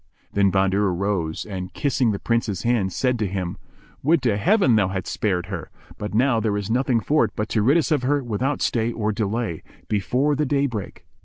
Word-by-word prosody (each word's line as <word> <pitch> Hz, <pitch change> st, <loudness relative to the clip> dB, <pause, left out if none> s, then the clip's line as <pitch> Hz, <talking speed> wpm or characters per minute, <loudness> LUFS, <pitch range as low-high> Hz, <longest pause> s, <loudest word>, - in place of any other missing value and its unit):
Then 100 Hz, -1 st, +3 dB
Bahadur 95 Hz, +1 st, +2 dB
rose 90 Hz, -3 st, -2 dB
and, 95 Hz, -3 st, -6 dB
kissing 130 Hz, -5 st, +1 dB
the 100 Hz, -, -2 dB
Prince's 115 Hz, -4 st, -1 dB
hand, 115 Hz, -6 st, +1 dB
said 125 Hz, +4 st, 0 dB
to 105 Hz, -, 0 dB
him, 95 Hz, -1 st, -3 dB, 0.4 s
"Would 155 Hz, 0 st, +2 dB
to 115 Hz, -5 st, +2 dB
Heaven 155 Hz, -, +3 dB
thou 100 Hz, -3 st, +3 dB
hadst 95 Hz, -1 st, -4 dB
spared 90 Hz, -5 st, 0 dB
her! 95 Hz, -3 st, -6 dB, 0.3 s
but 105 Hz, 0 st, -4 dB
now 120 Hz, 0 st, +3 dB
there 105 Hz, -2 st, 0 dB
is 100 Hz, +1 st, -3 dB
nothing 125 Hz, -1 st, +2 dB
for 150 Hz, +7 st, +2 dB
it -, -, -6 dB
but 110 Hz, -1 st, -2 dB
to 110 Hz, -, +1 dB
rid 135 Hz, +10 st, +4 dB
us 165 Hz, -, 0 dB
of 150 Hz, -4 st, +3 dB
her 140 Hz, +2 st, +1 dB
without 125 Hz, +5 st, -1 dB
stay 115 Hz, 0 st, +1 dB
or 110 Hz, -2 st, -1 dB
delay, 105 Hz, -4 st, -2 dB, 0.3 s
before 125 Hz, -, +1 dB
the 150 Hz, -, 0 dB
day 140 Hz, 0 st, +2 dB
break." 110 Hz, -7 st, -5 dB
110 Hz, 210 wpm, -23 LUFS, 100-130 Hz, 0.4 s, rid